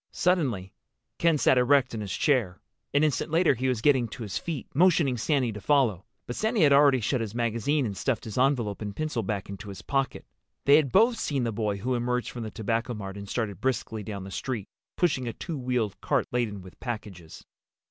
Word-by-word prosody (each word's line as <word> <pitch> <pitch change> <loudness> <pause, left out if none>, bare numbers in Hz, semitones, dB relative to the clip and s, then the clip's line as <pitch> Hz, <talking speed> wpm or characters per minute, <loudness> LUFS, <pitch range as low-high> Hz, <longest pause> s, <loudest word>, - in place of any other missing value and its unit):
Suddenly 130 - 0 0.5
Ken 165 -2 +3
sat 130 -2 +4
erect 135 +1 +3
in 110 - -3
his 100 -3 -5
chair. 115 -11 +1 0.3
An 145 - +3
instant 155 +1 +1
later 165 0 +4
he 130 +1 -2
was 125 -3 -1
getting 130 -5 +4
to 115 - -8
his 105 - -3
feet, 160 -7 -4
motioning 160 -4 +4
Sandy 130 0 +1
to 105 -1 -8
follow. 120 - +2 0.2
But 120 - -5
Sandy 220 -1 0
had 145 -3 +6
already 140 -2 +6
shut 125 +3 0
his 110 -1 -5
magazine 120 +5 0
and 100 -3 -3
stuffed 125 +4 -1
his 110 - -7
envelope 125 -6 +1
and 105 -2 -5
pencil 155 -5 -2
back 100 -1 -3
into 100 +1 -8
his 95 -2 -9
pocket. 135 -1 -1 0.4
They 140 +1 +7
had 145 -5 +1
both 230 +3 +4
seen 140 - -1
the 115 - 0
boy 105 -2 -1
who 125 +6 -2
emerged 125 0 -1
from 120 - -7
the 110 - -4
Tobacco 115 +3 -2
Mart 100 -2 -6
and 100 -1 -8
started 110 -4 -3
briskly 125 -4 -1
down 100 -2 -6
the 95 - -8
street, 120 -2 -3 0.3
pushing 140 -8 +1
a 115 - -3
two 170 - -5
wheeled 125 -5 -1
cart - - +1
laden 110 -6 -2
with 95 - -14
packages. 105 -9 -7
120 Hz, 210 wpm, -27 LUFS, 105-140 Hz, 0.5 s, They